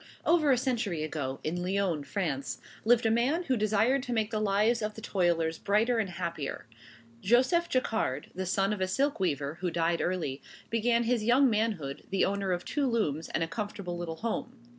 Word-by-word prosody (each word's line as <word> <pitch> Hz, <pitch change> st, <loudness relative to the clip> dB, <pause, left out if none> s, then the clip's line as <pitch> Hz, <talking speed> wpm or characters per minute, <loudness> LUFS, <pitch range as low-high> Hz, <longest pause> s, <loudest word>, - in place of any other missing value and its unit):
Over 325 Hz, -3 st, +4 dB
a 255 Hz, -, +4 dB
century 230 Hz, -, -1 dB
ago, 140 Hz, -4 st, -3 dB
in 175 Hz, +3 st, -2 dB
Lyons, 180 Hz, -5 st, -1 dB
France, 150 Hz, -9 st, -2 dB, 0.3 s
lived 240 Hz, 0 st, +4 dB
a 225 Hz, -, +4 dB
man 260 Hz, +10 st, +2 dB
who 265 Hz, -6 st, +1 dB
desired 220 Hz, +5 st, +2 dB
to 250 Hz, -1 st, -4 dB
make 220 Hz, -1 st, 0 dB
the 215 Hz, -, 0 dB
lives 215 Hz, +3 st, +2 dB
of 210 Hz, 0 st, -3 dB
the -, -, -8 dB
toilers 170 Hz, -6 st, 0 dB
brighter 225 Hz, +4 st, +2 dB
and 205 Hz, -4 st, -1 dB
happier. 170 Hz, -8 st, -4 dB, 0.6 s
Joseph 260 Hz, -, +3 dB
Jacquard, 220 Hz, -, -1 dB
the 185 Hz, +1 st, -4 dB
son 195 Hz, +3 st, +1 dB
of 205 Hz, -, -5 dB
a 185 Hz, -, +1 dB
silk 275 Hz, +9 st, 0 dB
weaver 150 Hz, -4 st, -1 dB
who 180 Hz, -, 0 dB
died 170 Hz, 0 st, 0 dB
early, 160 Hz, -7 st, -2 dB, 0.3 s
began 235 Hz, +1 st, +2 dB
his 235 Hz, -1 st, +1 dB
young 250 Hz, +3 st, +4 dB
manhood, 210 Hz, -11 st, -1 dB
the 195 Hz, -, +2 dB
owner 195 Hz, -1 st, -1 dB
of 175 Hz, 0 st, -2 dB
two 285 Hz, -2 st, 0 dB
looms 165 Hz, -, -1 dB
and 165 Hz, -, 0 dB
a -, -, -1 dB
comfortable 200 Hz, -1 st, -4 dB
little 170 Hz, -2 st, -4 dB
home. 225 Hz, +6 st, -4 dB
200 Hz, 190 wpm, -29 LUFS, 170-235 Hz, 0.6 s, Over